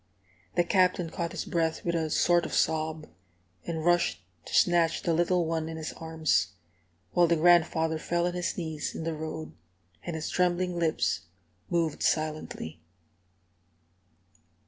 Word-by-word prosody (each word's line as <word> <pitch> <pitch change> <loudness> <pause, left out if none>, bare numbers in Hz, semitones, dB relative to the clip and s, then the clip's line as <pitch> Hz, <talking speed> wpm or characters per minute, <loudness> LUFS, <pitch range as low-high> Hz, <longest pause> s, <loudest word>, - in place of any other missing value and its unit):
The 175 - +4
Captain 180 -2 +2
caught 170 -1 -3
his - - -4
breath 165 -1 -1
with 170 - 0
a 160 -2 0
sort 175 +2 +3
of - - -4
sob, 155 -1 0 0.6
and 160 -2 -3
rushed 175 - +2 0.2
to - - -9
snatch 170 -2 +3
the 170 -4 +1
little 175 +1 +2
one 160 0 -2
in 160 - -6
his 155 -1 -5
arms; 155 - 0 0.6
while 175 -1 +4
the 170 - +3
grandfather 160 -1 +3
fell 175 +2 0
on 175 - -1
his 180 -1 -2
knees 160 -4 -4
in - - -4
the 165 0 -2
road, 155 0 -5 0.5
and 170 - -4
his 160 0 -4
trembling 180 0 +1
lips 160 - 0 0.4
moved 165 -3 0
silently. 155 - -2
165 Hz, 145 wpm, -28 LUFS, 160-175 Hz, 0.6 s, The